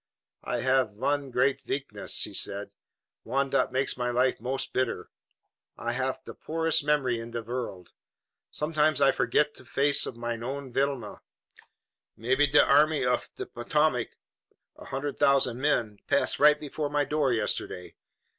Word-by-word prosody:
"I - - -2
haf 130 -4 +2
one 140 +5 -1
great 130 +2 +1
veakness," 135 -7 -1
he - - -4
said, 100 +1 -1 0.5
"one 135 +3 -1
dot - - +2
makes 130 +2 0
my 125 0 -2
life 125 -1 +1
most 135 +2 -3
bitter. 130 0 -2 0.7
I 120 - -2
haf 130 +2 -2
de - - -9
poorest 160 -1 0
memory 135 -5 +1
in 115 0 -7
de 115 -1 -5
vorld. 115 -7 -5 0.6
Somedimes 150 -1 +1
I 135 -1 +5
forget 150 +2 +1
de - - -10
face 140 +1 +2
of 115 - -7
mein 120 -1 -4
own 135 +1 -5
Vilhelmina. 135 -1 -1 1.0
Maybe 130 +5 +2
de 145 +1 +5
Army 150 0 +4
uf 125 0 0
de - - -5
Potomac, 125 +1 0 0.6
a - - -13
hundred 140 +2 -4
thousand 130 -3 +3
men, 115 -8 0
pass 140 - +2
right 150 +1 +6
before 150 0 -4
my 145 0 +1
door 150 -3 +1
yesterday. 110 -5 -2
135 Hz, 155 wpm, -28 LUFS, 120-145 Hz, 1.0 s, right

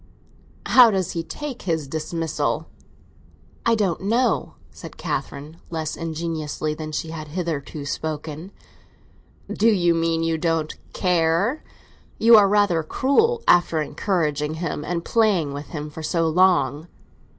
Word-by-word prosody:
"How 250 -3 +7
does 190 -4 -1
he 170 - -2
take 265 - -7
his 160 -5 -2
dismissal?" 155 0 -2 1.0
"I 230 - +4
don't 195 -6 0
know!" 230 +6 0 0.2
said - - -11
Catherine, 145 +3 -5
less 160 -2 -3
ingeniously 160 -2 -3
than 155 0 -6
she 160 +1 -4
had 155 -2 -7
hitherto 155 -3 -4
spoken. 155 +4 -5 1.0
"You 200 -6 +3
mean 165 0 0
you 165 -1 0
don't 165 -2 0 0.2
care? 180 - +1 0.5
You 230 +1 +7
are 205 -2 +6
rather 200 -5 +3
cruel, 445 - +1
after 175 -2 +4
encouraging 150 -2 -1
him 160 -3 -4
and 170 +1 -3
playing 195 -11 +2
with 145 +1 -7
him 150 -2 -6
for 160 - -8
so 165 +1 0
long!" 160 -3 +2
165 Hz, 130 wpm, -23 LUFS, 155-190 Hz, 1.0 s, How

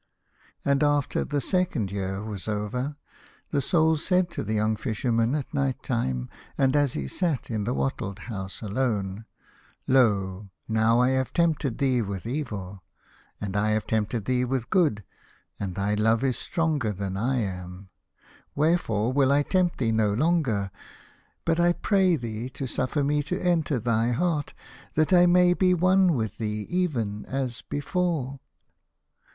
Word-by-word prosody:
And 140 -1 +2
after 145 -2 +2
the 145 0 -1
second 150 - 0
year 95 0 -3
was 105 -3 -6
over, 110 +7 -2 0.6
the 140 - +1
Soul 160 +2 +3
said 180 +2 +1
to - - -4
the 110 +1 -2
young 110 +1 +1
Fisherman 115 +2 0
at 145 -3 -4
night 135 -2 -1
time, 65 - -1 0.3
and 135 0 +3
as 145 -3 +3
he 70 -2 -3
sat 150 - -1
in 105 -2 -1
the - - 0
wattled 70 +8 -2
house 100 -2 -6
alone, 105 -2 -2 0.3
" - - -30 0.3
Lo! 100 -6 +2 0.2
now 110 +1 +3
I 125 +1 +4
have 130 -1 0
tempted 155 -7 +1
thee 130 -3 +2
with 100 -2 -4
evil, 105 -8 -4 0.6
and 100 -1 -4
I 105 +1 +2
have 110 0 0
tempted 110 0 -1
thee 125 -1 +1
with 125 -2 -2
good, 150 - +2 0.6
and 95 -3 -4
thy 100 +1 0
love 110 +3 +2
is 130 -2 +1
stronger 155 - -1
than 95 -1 -4
I 125 +7 0
am. 90 -1 -6 0.7
Wherefore 135 -8 +1
will 135 -1 +3
I 145 +1 +4
tempt 180 +1 +1
thee 115 -3 +1
no 110 -2 +2
longer, 130 - +1 0.7
but 165 0 +1
I 175 0 +4
pray 190 -2 +2
thee 115 -2 -5
to 135 - -5
suffer 130 +3 -1
me 145 +1 +1
to 155 +5 -3
enter 165 -6 +1
thy 115 +1 +1
heart, 155 +1 -1 0.4
that 155 +4 +2
I 175 0 +7
may 180 0 +5
be 180 0 +3
one 185 0 +4
with 110 -2 -3
thee 105 -1 -2
even 120 - -1
as 130 -3 -3
before." 145 -3 -2
125 Hz, 160 wpm, -26 LUFS, 105-150 Hz, 0.7 s, I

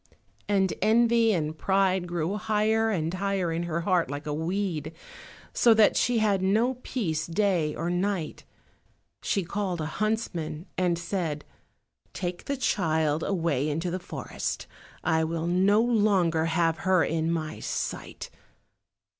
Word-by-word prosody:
And 195 -2 +2
envy 230 +2 +4
and 155 -5 -1
pride 190 0 +1
grew 175 +2 -2
higher 220 +1 +1
and 165 -5 -1
higher 190 -2 -1
in 165 +1 -1
her 170 +1 -1
heart 180 -1 +1
like 145 +2 -5
a 150 - -2
weed, 165 -1 -2 0.6
so 230 -2 +5
that 215 -1 +5
she 245 -1 +2
had 205 -3 +2
no 225 +7 +1
peace 160 -14 -2
day 170 -4 +1
or 170 +2 -2
night. 180 -2 -2 0.8
She 195 - 0
called 185 0 -3
a 155 - -2 0.2
huntsman, 185 -7 -2
and 180 -2 +1
said, 170 -4 -3 0.7
"Take 175 -1 -4
the 280 - -2
child 160 - +1
away 160 -7 0
into 165 +4 -2
the 185 - -2
forest; 175 - -5 0.4
I 160 -1 +2
will 165 0 -2
no 190 +4 +3
longer 200 -9 +2
have 165 0 +1
her 185 -2 +3
in 160 0 0
my 155 -2 -3
sight. - - -5
180 Hz, 140 wpm, -27 LUFS, 160-205 Hz, 0.8 s, so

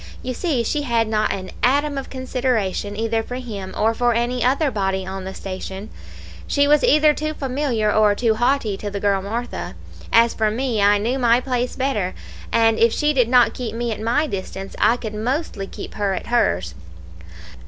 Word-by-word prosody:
You 255 - -3
see 275 -4 0
she 295 +6 -1
had 235 -5 +1
not 215 -1 +1
an 185 -1 -5
atom 285 +3 +2
of 275 - -5
consideration 245 -6 -1
either 225 +1 0
for 245 +2 -7
him 210 -7 -6
or 225 +1 +2
for 240 0 +1
any 240 +1 0
other 275 +3 +2
body 190 -3 -1
on 190 0 -6
the 190 - -5
station; 190 +2 -6 0.6
she 285 0 +2
was 295 0 +4
either 305 +1 +5
too 310 +1 -3
familiar 255 -6 0
or 210 -1 +4
too 230 0 +2
haughty 240 -3 +1
to 205 - -5
the 200 0 -4
girl 200 -1 +1
Martha; 230 +5 -5 0.4
as 230 0 +5
for 220 -1 +1
me, 230 -1 -1
I 205 +1 +5
knew 235 +6 -1
my 240 -1 +4
place 250 -1 -2
better, 215 -9 -1 0.4
and 225 -1 +3
if 230 0 +5
she 300 +5 +1
did 250 -4 +2
not 250 -1 +5
keep 230 -3 -5
me 235 0 -2
at 215 - -4
my 240 +7 +1
distance, 195 -5 -6
I 225 +3 +4
could 220 -3 -6
mostly 225 -2 -2
keep - - -8
her 200 -2 -1
at - - -5
hers. 90 - +1
230 Hz, 195 wpm, -21 LUFS, 205-255 Hz, 0.6 s, either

